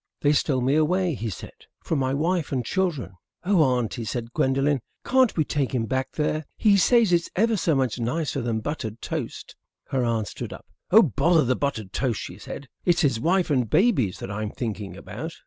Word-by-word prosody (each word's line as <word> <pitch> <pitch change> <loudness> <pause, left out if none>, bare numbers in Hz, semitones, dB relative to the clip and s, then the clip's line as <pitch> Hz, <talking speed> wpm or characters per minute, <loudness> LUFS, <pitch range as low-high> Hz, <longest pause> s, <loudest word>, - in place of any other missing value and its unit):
"They 145 0 +4
stole 135 -3 +1
me 130 +3 +2
away," 175 +3 +2
he 115 -3 -4
said, 95 - -8 0.3
"from 160 - -1
my 130 -1 0
wife 160 +3 0
and 125 -4 -1
children." 150 - -2 0.3
"Oh, 185 -1 +3
Auntie," 125 -4 +1
said 115 +1 -4
Gwendolen, 135 +1 +2 0.3
"can't 260 -5 +3
we 155 - +4
take 140 -3 -1
him 115 -2 0
back 130 +2 -2
there? 155 0 -1
He 210 -3 +4
says 220 0 +4
it's 170 -1 +2
ever 225 +4 +3
so 165 -5 +1
much 130 -3 0
nicer 140 +4 -1
than 115 -2 -1
buttered 115 -5 -4
toast." - - -5 0.3
Her 130 -2 0
aunt 115 -3 0
stood - - -6
up. - - -11 0.2
"Oh, 220 +4 +8
bother 165 - +3
the 130 +1 +2
buttered 110 -9 -3
toast," 125 -5 -1
she - - -8
said. 140 - -8 0.2
"It's 175 -1 +3
his 135 -8 +2
wife 175 +3 +1
and 125 -6 +1
babies 135 - +2
that 95 - -6
I'm 105 +1 -3
thinking 105 -5 -5
about." 110 - -7
135 Hz, 200 wpm, -25 LUFS, 115-170 Hz, 0.3 s, Oh